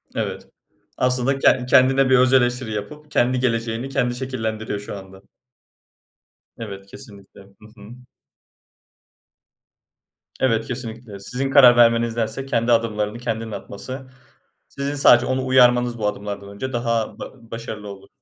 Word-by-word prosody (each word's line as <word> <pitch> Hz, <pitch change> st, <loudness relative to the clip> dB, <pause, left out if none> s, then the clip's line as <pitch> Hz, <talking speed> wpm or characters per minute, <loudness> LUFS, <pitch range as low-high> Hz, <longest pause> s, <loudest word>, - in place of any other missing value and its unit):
Evet. -, -, -4 dB, 0.5 s
Aslında 125 Hz, +2 st, +1 dB
ken 125 Hz, -, +3 dB
kendine 130 Hz, +1 st, +4 dB
bir 130 Hz, -, +5 dB
öz 130 Hz, +1 st, +4 dB
eleştiri 125 Hz, -3 st, +2 dB
yapıp 150 Hz, +9 st, -7 dB
kendi 125 Hz, +1 st, +2 dB
geleceğini 115 Hz, +1 st, -1 dB
kendi 125 Hz, -3 st, -1 dB
şekillendiriyor 110 Hz, -5 st, -4 dB
şu 105 Hz, 0 st, -7 dB
anda. 95 Hz, 0 st, -13 dB, 1.4 s
Evet 100 Hz, -3 st, -8 dB
kesinlikle. 105 Hz, -5 st, -13 dB
Hı 100 Hz, +2 st, -19 dB
hı. 100 Hz, -, -12 dB, 2.5 s
Evet 115 Hz, -4 st, +1 dB
kesinlikle. 115 Hz, -4 st, -7 dB
Sizin 130 Hz, +7 st, -3 dB
karar 130 Hz, -3 st, +8 dB
vermenizdense 115 Hz, +2 st, +2 dB
kendi 120 Hz, -3 st, 0 dB
adımlarını 110 Hz, -1 st, 0 dB
kendinin 115 Hz, -2 st, -4 dB
atması 130 Hz, +6 st, -8 dB, 0.6 s
sizin 140 Hz, +1 st, -4 dB
sadece 125 Hz, -3 st, +6 dB
onu 130 Hz, 0 st, -1 dB
uyarmanız 125 Hz, -2 st, +4 dB
bu 105 Hz, -2 st, -1 dB
adımlardan 100 Hz, -1 st, -5 dB
önce 120 Hz, +6 st, -6 dB
daha 115 Hz, -2 st, -2 dB
ba 115 Hz, -3 st, -11 dB
başarılı 110 Hz, -2 st, -7 dB
olur. 100 Hz, 0 st, -10 dB
120 Hz, 125 wpm, -21 LUFS, 110-130 Hz, 2.5 s, karar